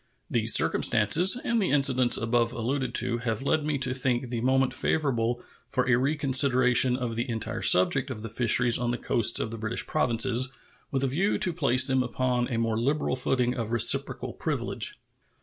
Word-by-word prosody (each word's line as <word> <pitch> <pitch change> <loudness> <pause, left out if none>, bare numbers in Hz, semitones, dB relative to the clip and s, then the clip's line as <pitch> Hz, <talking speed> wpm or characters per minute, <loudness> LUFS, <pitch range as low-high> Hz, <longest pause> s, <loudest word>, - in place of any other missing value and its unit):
These - - +4
circumstances 165 - +2
and 235 -1 0
the 190 - -1
incidents 130 -4 +3
above 115 +1 -1
alluded 125 +1 -4
to 120 0 +1
have 115 0 -4
led 155 +2 0
me 150 -1 -2
to 130 -1 -1
think 125 -1 -2
the 120 -2 -3
moment 130 +1 0
favorable 120 -5 -2 0.3
for 125 0 -2
a 125 - +3
reconsideration 130 -2 +2
of 125 -3 -4
the 120 +3 -4
entire 115 -2 -5
subject 130 +9 +3
of 110 -4 -8
the - - -5
fisheries 120 +1 +2
on 120 -1 -2
the 120 - -2
coasts 115 -1 0
of 110 - -4
the 115 - -7
British 110 +2 -2
Provinces, 125 -2 +1 0.4
with 135 -1 -2
a - - +1
view 175 +11 -1
to 180 - +1
place 135 -6 +3
them 130 -2 0
upon 125 0 -2
a 120 - -4
more 115 -1 -2
liberal 140 +2 -1
footing 125 -1 -1
of 115 -3 -5
reciprocal 120 0 +1
privilege. - - -5
125 Hz, 185 wpm, -26 LUFS, 120-135 Hz, 0.4 s, These